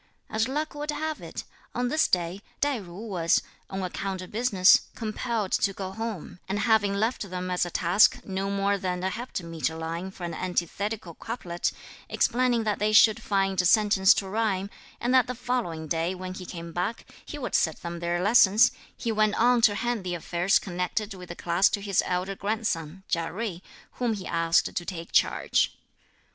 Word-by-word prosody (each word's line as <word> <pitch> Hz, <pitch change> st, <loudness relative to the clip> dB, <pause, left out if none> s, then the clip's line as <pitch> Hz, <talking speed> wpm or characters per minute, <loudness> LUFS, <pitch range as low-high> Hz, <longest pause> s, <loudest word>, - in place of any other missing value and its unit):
As 220 Hz, +1 st, +1 dB
luck 300 Hz, +4 st, -2 dB
would 295 Hz, +1 st, -5 dB
have 310 Hz, +1 st, -2 dB
it, -, -, -6 dB, 0.3 s
on 245 Hz, 0 st, 0 dB
this 310 Hz, +4 st, +3 dB
day 180 Hz, +2 st, 0 dB, 0.2 s
Tai 285 Hz, -4 st, +1 dB
jui 195 Hz, +3 st, -9 dB
was, 170 Hz, -5 st, +2 dB, 0.3 s
on 190 Hz, 0 st, -4 dB
account 185 Hz, +1 st, -3 dB
of 185 Hz, -, -11 dB
business, 205 Hz, -5 st, +4 dB
compelled 220 Hz, -2 st, -2 dB
to 200 Hz, -, +2 dB
go 190 Hz, -1 st, -5 dB
home; 220 Hz, -5 st, -6 dB
and 195 Hz, -, 0 dB
having 205 Hz, -2 st, +3 dB
left 215 Hz, -1 st, -1 dB
them 180 Hz, 0 st, -4 dB
as 180 Hz, -1 st, +1 dB
a -, -, -5 dB
task 175 Hz, +4 st, +4 dB
no 195 Hz, 0 st, -2 dB
more 200 Hz, 0 st, +1 dB
than 180 Hz, -1 st, -2 dB
a 190 Hz, -, 0 dB
heptameter 165 Hz, -9 st, -4 dB
line 165 Hz, +3 st, -4 dB
for 190 Hz, -1 st, -11 dB
an 170 Hz, -1 st, -3 dB
antithetical 185 Hz, +2 st, -3 dB
couplet, 175 Hz, -5 st, -3 dB, 0.4 s
explaining 245 Hz, -2 st, +2 dB
that 210 Hz, -2 st, -1 dB
they 210 Hz, +1 st, +2 dB
should 215 Hz, 0 st, +6 dB
find 195 Hz, -2 st, +1 dB
a -, -, -3 dB
sentence 200 Hz, -1 st, +5 dB
to 195 Hz, -, -2 dB
rhyme, 200 Hz, -1 st, -1 dB, 0.3 s
and 245 Hz, +2 st, 0 dB
that 255 Hz, -1 st, +5 dB
the 250 Hz, -, -4 dB
following 225 Hz, -11 st, -2 dB
day 165 Hz, +4 st, -1 dB
when 185 Hz, 0 st, -6 dB
he 185 Hz, -1 st, -8 dB
came 170 Hz, -1 st, -7 dB
back, 205 Hz, +6 st, -2 dB, 0.2 s
he 295 Hz, -, -7 dB
would 265 Hz, -, -5 dB
set 160 Hz, -, +1 dB
them 170 Hz, 0 st, -5 dB
their 175 Hz, +1 st, -1 dB
lessons, 210 Hz, 0 st, +6 dB, 0.3 s
he 230 Hz, -, -2 dB
went 215 Hz, -1 st, +2 dB
on 245 Hz, 0 st, +4 dB
to 205 Hz, -2 st, +5 dB
hand 240 Hz, -1 st, -1 dB
the 180 Hz, -1 st, -2 dB
affairs 175 Hz, +3 st, +2 dB
connected 185 Hz, +3 st, -3 dB
with 180 Hz, -2 st, -10 dB
the 175 Hz, -, -6 dB
class 175 Hz, +3 st, +3 dB
to 205 Hz, -, -2 dB
his 200 Hz, -2 st, +1 dB
elder 185 Hz, +2 st, -1 dB
grandson, 190 Hz, -5 st, -2 dB
Chia 165 Hz, -2 st, 0 dB
Jui, 190 Hz, -3 st, -4 dB, 0.3 s
whom 240 Hz, -2 st, -1 dB
he 195 Hz, -, -7 dB
asked 165 Hz, -1 st, +1 dB
to 175 Hz, -, -1 dB
take 170 Hz, -2 st, -7 dB
charge. -, -, +2 dB
195 Hz, 190 wpm, -27 LUFS, 180-220 Hz, 0.4 s, should